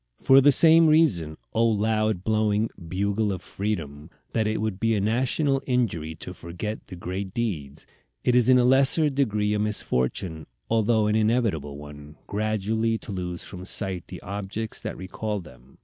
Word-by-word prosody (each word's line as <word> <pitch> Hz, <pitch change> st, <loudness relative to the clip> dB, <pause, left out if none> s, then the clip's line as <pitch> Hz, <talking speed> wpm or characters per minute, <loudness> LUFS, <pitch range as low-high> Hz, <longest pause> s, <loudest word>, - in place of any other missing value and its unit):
For 135 Hz, +1 st, +6 dB
the 145 Hz, +2 st, +6 dB
same 165 Hz, +3 st, +7 dB
reason, 95 Hz, -, +2 dB, 0.2 s
O 115 Hz, -, +2 dB
loud 110 Hz, -3 st, +1 dB
blowing 110 Hz, 0 st, +1 dB, 0.2 s
Bugle 100 Hz, +4 st, 0 dB
of 95 Hz, -2 st, -5 dB
Freedom, 80 Hz, -7 st, -4 dB, 0.2 s
that 110 Hz, -2 st, +1 dB
it 110 Hz, 0 st, -1 dB
would 105 Hz, -3 st, -3 dB
be 115 Hz, -1 st, +1 dB
a -, -, 0 dB
national 130 Hz, +6 st, +1 dB
injury 95 Hz, -, -1 dB
to -, -, -8 dB
forget 90 Hz, +6 st, -6 dB
the -, -, -9 dB
great 95 Hz, +2 st, -5 dB
deeds, 80 Hz, -13 st, -4 dB, 0.4 s
it 125 Hz, -, +2 dB
is 125 Hz, 0 st, +4 dB
in 130 Hz, -, +7 dB
a 125 Hz, -, +4 dB
lesser 135 Hz, +4 st, +4 dB
degree 105 Hz, -7 st, 0 dB
a 105 Hz, -, 0 dB
misfortune, 80 Hz, -5 st, -2 dB, 0.2 s
although 110 Hz, -1 st, +2 dB
an 105 Hz, 0 st, +1 dB
inevitable 110 Hz, -, 0 dB
one, 75 Hz, 0 st, -11 dB
gradually 110 Hz, +2 st, -1 dB
to 110 Hz, -, -10 dB
lose 90 Hz, -2 st, -4 dB
from 90 Hz, -1 st, -9 dB
sight 95 Hz, -1 st, -1 dB
the -, -, -9 dB
objects 105 Hz, +3 st, -5 dB
that -, -, -5 dB
recall 105 Hz, +3 st, -4 dB
them. 65 Hz, -6 st, -16 dB
105 Hz, 165 wpm, -25 LUFS, 90-115 Hz, 0.4 s, same